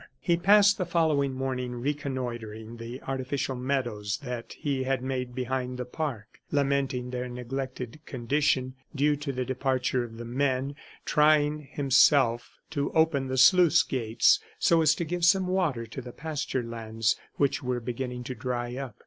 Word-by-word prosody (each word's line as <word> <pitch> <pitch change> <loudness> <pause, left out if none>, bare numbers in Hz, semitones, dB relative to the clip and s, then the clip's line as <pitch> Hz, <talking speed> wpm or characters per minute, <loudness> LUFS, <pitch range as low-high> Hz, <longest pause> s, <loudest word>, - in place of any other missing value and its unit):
He 170 - +2
passed 205 +3 +5
the 185 - 0
following 155 -5 +2
morning 130 -1 -3
reconnoitering 120 -5 -4
the 115 +3 -8
artificial 135 0 -2
meadows 120 -6 -2
that 125 -3 -5
he 140 -3 -2
had 130 -1 -1
made 125 -2 -3
behind 125 0 -2
the 125 - -4
park, 125 -5 -5
lamenting 135 -3 0
their 125 0 -3
neglected 125 +1 -5
condition 130 +1 0 0.2
due 145 +1 +3
to 145 0 -4
the 130 -1 -3
departure 130 -1 0
of 115 -1 -9
the 120 - -7
men, 130 +2 -1 0.3
trying 150 -1 +3
himself 135 -4 +4 0.2
to 140 -3 -1
open 160 -4 +2
the 130 0 -2
sluice 175 +4 +6
gates 115 -3 +3 0.2
so 165 -1 +4
as 155 -1 +4
to 170 - -3
give 175 +2 -3
some 185 +2 +5
water 175 -11 0
to 115 +4 -7
the 125 0 -9
pasture 150 -3 -3
lands 115 -1 -1 0.2
which 140 -1 +1
were 125 -1 -1
beginning 125 +1 -4
to 130 - -5
dry 120 0 -3
up. 135 -6 -6
130 Hz, 155 wpm, -28 LUFS, 125-145 Hz, 0.3 s, sluice